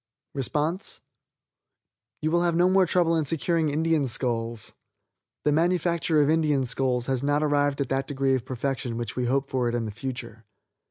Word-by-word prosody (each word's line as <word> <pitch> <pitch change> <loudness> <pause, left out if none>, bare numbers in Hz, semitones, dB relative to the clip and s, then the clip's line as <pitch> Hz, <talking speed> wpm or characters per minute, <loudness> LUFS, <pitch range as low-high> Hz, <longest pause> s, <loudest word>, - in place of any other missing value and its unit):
You 155 - +1
will 170 +1 +3
have 170 -1 +1
no 175 +1 +4
more 185 0 +4
trouble 165 -1 +2
in 160 -2 +1
securing 165 +1 +1
Indian 155 -1 +1
skulls. 115 -2 -1 0.7
The 150 - +4
manufacture 170 -1 +2
of - - +1
Indian 150 -4 +2
skulls 125 0 0
has 130 -2 -1
not 145 +2 +1
arrived 145 -1 +1
at 135 - -2
that 135 0 -1
degree 135 -2 0
of 130 -3 0
perfection 130 -2 -3
which 115 -2 -4
we 125 - -1
hope 135 +2 +1
for 125 -3 0
it 120 - -2
in 115 -1 -1
the 110 - -4
future. 125 +4 -7
140 Hz, 170 wpm, -26 LUFS, 125-160 Hz, 0.7 s, no